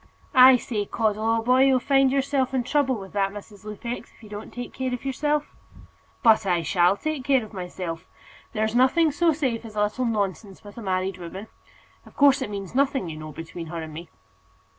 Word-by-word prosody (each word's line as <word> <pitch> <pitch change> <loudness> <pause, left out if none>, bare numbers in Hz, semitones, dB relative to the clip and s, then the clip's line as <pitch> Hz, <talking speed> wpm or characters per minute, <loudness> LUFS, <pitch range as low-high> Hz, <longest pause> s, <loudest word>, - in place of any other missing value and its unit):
"I 255 -1 +8
say, 215 -4 -3
Caudle, 215 -1 -1
old 225 0 +1
boy, 255 +2 +5
you'll 265 -1 +4
find 270 0 +3
yourself 270 -1 0
in 255 - +1
trouble 270 0 +1
with 195 -3 -9
that 195 -1 +1
Mrs. 205 0 -11
Lupex, 235 +3 -6
if - - -22
you 215 - -12
don't 210 +1 -8
take 245 0 -7
care 260 -1 -3
of 250 +1 -5
yourself." 295 +2 -1 0.7
"But 220 -2 +5
I 175 -2 +1
shall 180 +3 +3
take 310 -1 -3
care 265 -3 +2
of 215 - -15
myself. 180 -3 -6 0.5
There's 220 0 0
nothing 265 +6 +4
so 330 +3 +2
safe 265 -7 -1
as 220 -2 -10
a 210 - +2
little 215 +5 -1
nonsense 200 -3 -3
with 205 +3 -11
a - - -8
married 185 -1 -2
woman. 185 +5 -8 0.5
Of - - -18
course, 280 -1 +5
it - - -3
means 200 -2 -6
nothing, 270 -7 +1
you 155 - -7
know, 155 0 -8
between 165 +2 -8
her 165 +1 -5
and 155 -1 -9
me." 165 +2 -9
220 Hz, 205 wpm, -25 LUFS, 195-265 Hz, 0.7 s, I